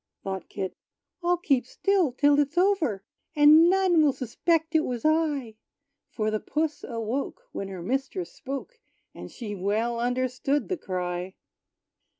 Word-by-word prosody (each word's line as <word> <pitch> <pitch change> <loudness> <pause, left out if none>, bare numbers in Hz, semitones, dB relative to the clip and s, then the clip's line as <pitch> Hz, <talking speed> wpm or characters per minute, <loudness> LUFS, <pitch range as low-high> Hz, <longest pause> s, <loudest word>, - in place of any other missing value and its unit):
Thought 190 -1 -5
Kit, 190 -2 -4 0.5
"I'll 350 0 +2
keep 275 -8 +1
still 380 -2 +1
till 285 +3 +3
it's 290 +3 0
over; 340 - +2 0.3
And 305 +3 +7
none 370 -3 +4
will 295 -3 +4
suspect 320 +7 0
it 320 - +5
was 245 -3 -4
I." 295 -8 +1 0.5
For 215 -1 -1
the 215 - 0
puss 305 +5 -2
awoke, 235 - -3
when 195 - -5
her 185 -3 -7
mistress 270 - -2
spoke; 280 - -7 0.3
And - - -9
she 220 -4 -7
well 215 +5 -1
understood 255 +3 0
the 370 - -1
cry. 180 - -4
270 Hz, 145 wpm, -26 LUFS, 220-320 Hz, 0.5 s, And